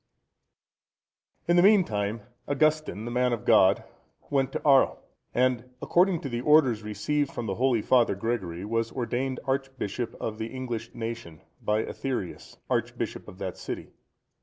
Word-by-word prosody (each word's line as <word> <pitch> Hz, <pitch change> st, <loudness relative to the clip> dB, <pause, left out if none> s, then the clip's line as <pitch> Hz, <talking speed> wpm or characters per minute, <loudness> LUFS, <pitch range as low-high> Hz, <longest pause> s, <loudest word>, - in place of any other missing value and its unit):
D.] -, -, +1 dB
In 175 Hz, -, +5 dB
the -, -, +7 dB
meantime, 115 Hz, -, +3 dB, 0.3 s
Augustine, 155 Hz, -6 st, +1 dB
the 120 Hz, -, -4 dB
man 125 Hz, 0 st, +2 dB
of 115 Hz, -, -4 dB
God, -, -, +5 dB, 0.5 s
went 135 Hz, -2 st, +1 dB
to -, -, -2 dB
Arles, 135 Hz, -2 st, +5 dB, 0.3 s
and, 125 Hz, -1 st, +1 dB
according 180 Hz, +2 st, +2 dB
to -, -, -4 dB
the 120 Hz, -1 st, -2 dB
orders 135 Hz, -6 st, +4 dB
received 135 Hz, +8 st, -1 dB
from 120 Hz, -, -4 dB
the 100 Hz, -, -1 dB
holy 120 Hz, 0 st, +1 dB
Father 120 Hz, -5 st, +4 dB
Gregory, 95 Hz, -5 st, -3 dB
was 115 Hz, +1 st, -1 dB
ordained 130 Hz, +1 st, -2 dB
archbishop 130 Hz, -4 st, -2 dB
of 110 Hz, -1 st, -4 dB
the 110 Hz, -, -2 dB
English 120 Hz, -2 st, -5 dB
nation,(118) 115 Hz, -9 st, -6 dB, 0.2 s
by 105 Hz, +1 st, +1 dB
Aetherius,(119) 125 Hz, -10 st, -5 dB
archbishop -, -, -2 dB
of -, -, -11 dB
that -, -, -5 dB
city. -, -, -6 dB
120 Hz, 150 wpm, -27 LUFS, 110-135 Hz, 0.5 s, the